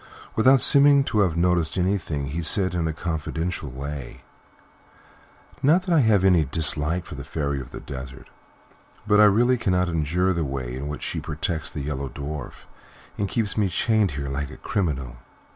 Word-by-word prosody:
Without 130 +4 +5
seeming 140 0 +7
to 110 - -1
have 90 -5 +1
noticed 85 -1 +1
anything, 85 -7 -1
he 80 +4 -3
said, 95 +3 +2
in 85 -2 -1
a - - -1
confidential 80 0 -4
way: 70 0 -7 1.4
"Not 165 +7 +3
that 180 -2 -1
I 165 - +5
have 110 -7 +3
any 90 -4 +4
dislike 80 +3 +1
to - - -7
the 70 -1 -7
Fairy 70 0 -3
of 65 - -11
the - - -9
Desert, 65 -1 -9 0.8
but 105 -1 +3
I 105 - +8
really 120 +5 +3
cannot 90 -5 0
endure 85 +4 0
the 85 -2 -1
way 65 -3 -4
in 70 +2 -5
which 75 0 -6
she - - -2
protects 80 +1 -4
the 75 - -6
Yellow 70 -1 -4
Dwarf 75 +3 -7 0.5
and 100 -1 -2
keeps 105 -1 -2
me 105 -3 +1
chained 105 0 +1
here 70 -1 -4
like 70 +1 -4
a - - -11
criminal. 70 - -3
85 Hz, 175 wpm, -24 LUFS, 70-100 Hz, 1.4 s, I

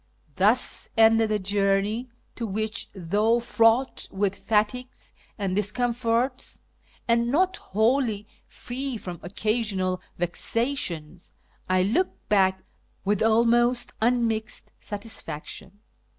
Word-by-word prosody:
Thus 205 - +2
ended 225 0 +5
a 215 - +2
journey 200 +4 0 0.2
to 230 - -4
which, 215 +2 -3
though 205 +6 +2
fraught 230 +2 +2
with 195 0 -1
fatigues 225 +4 -1 0.2
and 195 -3 -1
discomforts, 235 +4 0 0.5
and 235 0 +3
not 365 +7 +2
wholly 220 0 +1 0.2
free 260 0 -5
from 180 -5 -7
occasional 195 -1 -1 0.2
vexations, 175 - -2 0.4
I 185 0 +3
look 300 - +2 0.2
back 190 -2 +3 0.4
with 205 0 +1
almost 235 +2 +3
unmixed 225 -2 0
satisfaction. 205 -2 -7
220 Hz, 95 wpm, -26 LUFS, 195-240 Hz, 0.5 s, ended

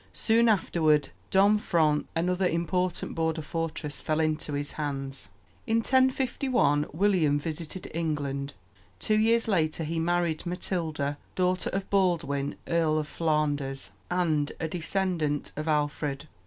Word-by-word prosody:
Soon 230 +1 +3
afterward 160 -7 +2 0.2
Domfront, 190 -6 +3
another 180 +2 +1
important 180 +1 -1
border 160 -1 -1
fortress, 160 -2 -4
fell 155 0 0
into 155 -1 0
his 145 0 -3
hands. 135 - -4 0.4
In 225 - +2
1051 255 - +2
William 165 -4 +2
visited 165 +3 -5
England. 145 -4 -2 0.4
Two 215 0 +2
years 230 +1 +3
later 165 -5 +1
he 165 +1 -2
married 170 -1 0
Matilda, 160 -5 -2 0.2
daughter 180 -1 +1
of 195 0 -3
Baldwin, 165 -8 +1
Earl 165 -2 +2
of 155 -1 -1
Flanders, 145 -4 -1 0.2
and 160 -5 +1
a 165 - -1
descendant 165 -3 -1
of 155 +2 -4
Alfred. 150 -1 -1
160 Hz, 120 wpm, -28 LUFS, 150-185 Hz, 0.4 s, Soon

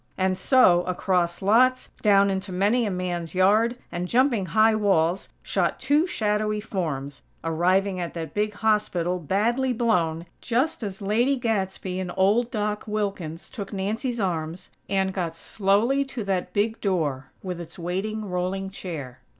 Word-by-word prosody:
And 185 0 +1
so, 185 -6 +5
across 180 -1 0
lots, 255 +6 +4
down 200 -2 +5
into 190 0 -3
many 210 +6 +2
a - - 0
man's 180 -2 -3
yard, 215 +6 +3
and 175 +1 -3
jumping 235 -4 +2
high 220 +5 +4
walls, 195 -4 +1
shot - - 0
two 290 +6 +2
shadowy 210 -5 0
forms, 155 -10 -4 0.2
arriving 185 +4 +1
at 175 -1 -4
that 165 -1 -5
big 210 0 -1
hospital, 195 -5 +1
badly 235 - +1
blown, 175 -9 +1 0.2
just 255 +7 0
as 200 -2 -5
Lady 235 +7 +2
Gadsby 190 -5 -2
and 185 -1 -3
old 210 +6 +3
Doc 210 -3 -2
Wilkins 195 -6 -3
took 200 -5 -7
Nancy's 220 +5 -2
arms, 170 -3 -3 0.2
and 190 -1 +1
got 170 -4 -3
slowly 210 +10 +1
to 255 -4 -5
that 190 -2 -1
big 215 +4 0
door 150 -9 -1
with 180 -2 -4
its 170 - -10
waiting 195 +5 -3
rolling 190 +1 -2
chair. 145 -10 -7
195 Hz, 150 wpm, -25 LUFS, 180-220 Hz, 0.2 s, so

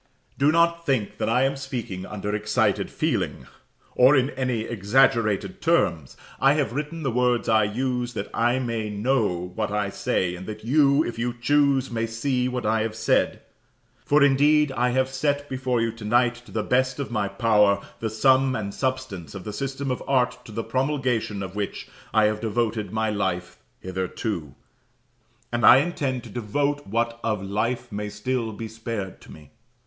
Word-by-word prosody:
Do 140 +2 +4
not 170 +1 +2
think 130 -9 -1
that - - 0
I 125 +3 +3
am 135 +1 +1
speaking 120 -9 -5
under 105 0 -4
excited 105 0 +1
feeling, - - -2 0.5
or 130 +3 +6
in 135 +1 +2
any 130 -3 -1
exaggerated 115 - +1
terms. 85 - +1 0.2
I 135 +1 +5
have 145 -7 0
written 150 +4 -4
the 135 - 0
words 125 0 +1
I 110 -1 +4
use, 125 +2 -2
that 100 -1 -3
I 120 +2 +2
may 115 -4 -2
know 105 -5 0
what 110 +3 -2
I 105 -1 -1
say, 90 -2 -1
and 95 +1 -9
that 110 0 -7
you, 140 +3 +4
if 120 - -5
you 120 +1 -1
choose, 140 -1 +2
may 115 -1 -1
see 125 +3 -1
what 125 -2 -3
I 110 +1 +2
have 110 0 -2
said. 110 0 +1 0.6
For, 145 0 +4
indeed, 145 +1 +4
I 125 -1 +1
have 130 +1 +1
set 145 +2 -1
before 130 -2 -1
you 115 0 0
tonight, 120 +2 +1
to - - -13
the 110 - -1
best 130 0 +1
of 140 - -4
my 110 -4 0
power, 105 -2 +3 0.2
the 110 - -2
sum 130 +4 +3
and 100 -2 -4
substance 130 - -3
of 95 - -7
the 105 - -6
system 135 +3 -3
of 125 - -3
art 125 -2 +1
to 110 - -11
the 115 +2 -3
promulgation 130 -7 -1
of 95 0 -7
which 105 -1 -4 0.2
I 110 - +4
have 105 0 +1
devoted 110 -1 -1
my 110 0 0
life 90 -3 -2 0.2
hitherto, 95 - -4 1.0
and 120 0 -1
intend 135 -3 +4
to - - -10
devote 145 +6 -1
what 115 +3 -1
of 105 -4 -1
life 105 +6 -2
may 105 0 -4
still 115 +2 -2
be 110 +1 -6
spared 110 -4 -6
to - - -14
me. 75 -3 -14
120 Hz, 175 wpm, -24 LUFS, 105-130 Hz, 1.0 s, or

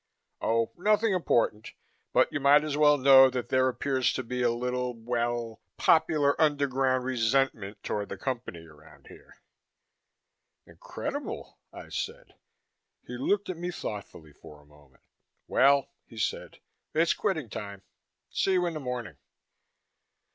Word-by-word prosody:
Oh, 115 0 +1
nothing 210 +3 +2
important, 115 - 0 0.4
but - - +2
you - - -1
might 145 +2 +5
as 150 -2 -3
well 150 0 +5
know 135 -1 +7
that 125 -1 -4
there 130 0 +3
appears 130 0 0
to 130 - -3
be 125 +1 -4
a 120 - +3
little, 125 +1 -2
well, 120 0 -3 0.2
popular 155 -3 +3
underground 135 -4 +1
resentment 115 -4 0
toward 105 -1 -3
the 100 - -6
Company 115 -8 -5
around 80 0 -18
here." - - -16 1.3
"Incredible!" - - -7
I - - -11
said. - - -6 0.7
He 125 - -7
looked 200 +11 0
at 185 - -5
me 175 +1 -4
thoughtfully 100 - -7
for 75 +1 -15
a 75 - -21
moment. 75 -3 -23 0.4
"Well," 140 +1 +3 0.2
he 115 - -15
said, - - -3 0.4
"it's 165 +1 +3
quitting 160 - -2
time. 100 -2 -8 0.5
See 195 - +1
you 180 -1 +2
in 170 - -2
the 155 - -5
morning." 125 - -5
125 Hz, 140 wpm, -28 LUFS, 115-145 Hz, 1.3 s, know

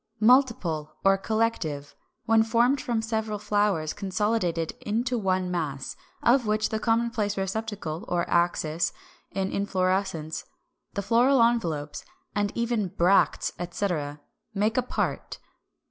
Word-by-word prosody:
Multiple 215 - +3
or 195 0 +6
Collective, 195 -9 -1 0.3
when 225 0 +5
formed 235 +5 +3
from 230 -2 -1
several 220 -1 -2
flowers 205 -7 0
consolidated 190 -4 -1
into 235 +4 -1
one 185 -4 0
mass, 150 -6 -3 0.3
of 240 -1 +4
which 215 0 +1
the 220 - -1
common 230 +1 +1
receptacle 205 -4 -2
or 175 -1 0
axis 170 -2 +1 0.4
of 190 0 -1
inflorescence, 185 -4 -1 0.5
the 200 - -1
floral 240 +4 +4
envelopes, 165 -12 0 0.3
and 205 -1 0
even 235 -1 0
the 190 - -2
bracts, 185 +1 +2
etc., 170 -5 -2 0.4
make 210 +3 +1
a 255 - +3
part. 250 - -3
200 Hz, 120 wpm, -26 LUFS, 175-225 Hz, 0.5 s, or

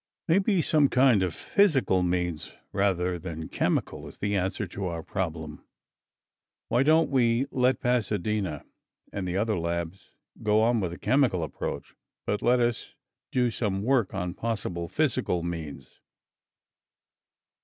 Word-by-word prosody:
"Maybe 190 +1 +3
some 145 -3 +3
kind 125 -5 +4
of 90 -2 0
physical 140 - +2
means, 90 -2 -1 0.2
rather 90 -3 +1
than 80 -3 -6
chemical, - - -1
is - - -12
the 105 0 -1
answer 95 +2 -1
to 95 +2 -6
our 85 -2 -4
problem. 80 -6 -4 1.1
Why 120 - +3
don't 155 +3 +4
we 120 -1 +3
let 125 0 +2
Pasadena 105 - -1 0.5
and 95 -2 -3
the 90 +1 -1
other 105 -2 0
labs 85 +2 -4 0.3
go 105 +1 +3
on 120 0 +3
with 95 -4 -1
the 85 - -7
chemical 125 - +2
approach 80 - -5 0.3
but 105 - -1
let 125 +1 +3
us 120 -1 -1 0.4
do 125 -2 +2
some 100 -4 -2
work 125 -4 +2
on 90 -3 -3
possible 95 -6 -3
physical 120 - 0
means?" 80 -6 -6
100 Hz, 135 wpm, -27 LUFS, 90-125 Hz, 1.1 s, kind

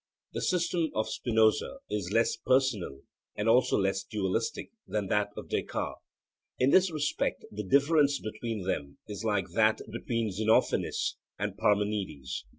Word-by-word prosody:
The - - -3
system 170 -2 +1
of 110 - 0
Spinoza 110 - +2
is 100 -3 -3
less 115 +2 +2
personal 115 - +1 0.3
and 105 - -2
also 120 +3 +4
less 95 0 0
dualistic 100 +2 -2 0.2
than 105 -3 -2
that 105 0 +2
of - - -7
Descartes. - - -3 0.6
In 130 +2 +3
this 185 0 +5
respect 150 -3 -1
the 105 - -4
difference 140 - +4
between 110 -1 -4
them 70 -7 -3
is 105 +1 -6
like 105 -4 0
that 110 +3 +3
between 115 -3 -2
Xenophanes 110 +4 +1 0.2
and 100 0 -3
Parmenides. 100 -11 -1
110 Hz, 140 wpm, -29 LUFS, 100-125 Hz, 0.6 s, this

